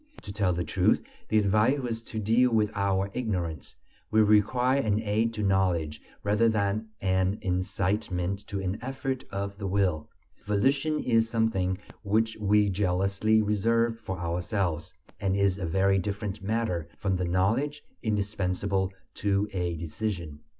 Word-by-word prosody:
To 100 Hz, -, -7 dB
tell 100 Hz, -3 st, +1 dB
the 85 Hz, 0 st, -1 dB
truth, 75 Hz, -, +2 dB, 0.3 s
the 110 Hz, -, +3 dB
advice 105 Hz, +6 st, +3 dB
was 120 Hz, -4 st, -3 dB
to 115 Hz, -, -8 dB
deal 115 Hz, +4 st, +3 dB
with 110 Hz, -2 st, +2 dB
our 100 Hz, -1 st, 0 dB
ignorance; 90 Hz, -, -3 dB, 0.3 s
we 110 Hz, 0 st, +5 dB
required 125 Hz, +6 st, +3 dB
an 105 Hz, -1 st, +1 dB
aid 110 Hz, +1 st, +1 dB
to 105 Hz, -, -2 dB
knowledge 90 Hz, -6 st, +1 dB, 0.2 s
rather 105 Hz, +3 st, +3 dB
than 105 Hz, 0 st, 0 dB
an 95 Hz, +1 st, +1 dB
incitement 95 Hz, 0 st, -1 dB
to 100 Hz, -, -3 dB
an 95 Hz, +2 st, -2 dB
effort 135 Hz, +1 st, -3 dB
of 100 Hz, 0 st, -4 dB
the 100 Hz, -, -3 dB
will. 90 Hz, -5 st, 0 dB, 0.3 s
Volition 135 Hz, +9 st, +1 dB
is 115 Hz, -2 st, +2 dB
something 110 Hz, -5 st, +1 dB, 0.2 s
which 110 Hz, +2 st, +1 dB
we 105 Hz, -1 st, +3 dB
jealously 100 Hz, +3 st, +2 dB
reserve 115 Hz, +2 st, +1 dB
for 95 Hz, -4 st, -5 dB
ourselves, 85 Hz, 0 st, -2 dB, 0.3 s
and 95 Hz, -2 st, 0 dB
is 100 Hz, -1 st, +2 dB
a 90 Hz, -, -2 dB
very 95 Hz, +3 st, +3 dB
different 100 Hz, +1 st, -4 dB
matter 95 Hz, -6 st, -1 dB
from 100 Hz, -4 st, 0 dB
the 90 Hz, -, -1 dB
knowledge 105 Hz, +12 st, 0 dB, 0.2 s
indispensable 100 Hz, -3 st, -1 dB, 0.2 s
to 100 Hz, 0 st, 0 dB
a 90 Hz, -2 st, -1 dB
decision. 85 Hz, -1 st, -4 dB
100 Hz, 145 wpm, -28 LUFS, 95-110 Hz, 0.3 s, we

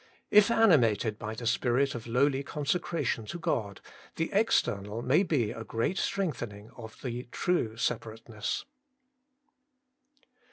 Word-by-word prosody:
If 210 Hz, 0 st, +7 dB
animated 125 Hz, -, +3 dB
by 110 Hz, 0 st, -5 dB
the 115 Hz, -, -6 dB
spirit 125 Hz, +4 st, +2 dB
of 120 Hz, -1 st, -7 dB
lowly 135 Hz, +3 st, +2 dB
consecration 150 Hz, -4 st, -2 dB
to 175 Hz, -, -5 dB
God, 105 Hz, -, -2 dB, 0.3 s
the 165 Hz, -, -2 dB
external 115 Hz, -, +1 dB
may 145 Hz, +8 st, +4 dB
be 140 Hz, -, +1 dB
a 115 Hz, -, -6 dB
great 115 Hz, -, -1 dB
strengthening 120 Hz, -, -3 dB
of 110 Hz, -2 st, -11 dB
the 125 Hz, -1 st, -4 dB
true 115 Hz, -11 st, 0 dB
separateness. 115 Hz, -1 st, -3 dB
120 Hz, 120 wpm, -29 LUFS, 110-160 Hz, 0.3 s, If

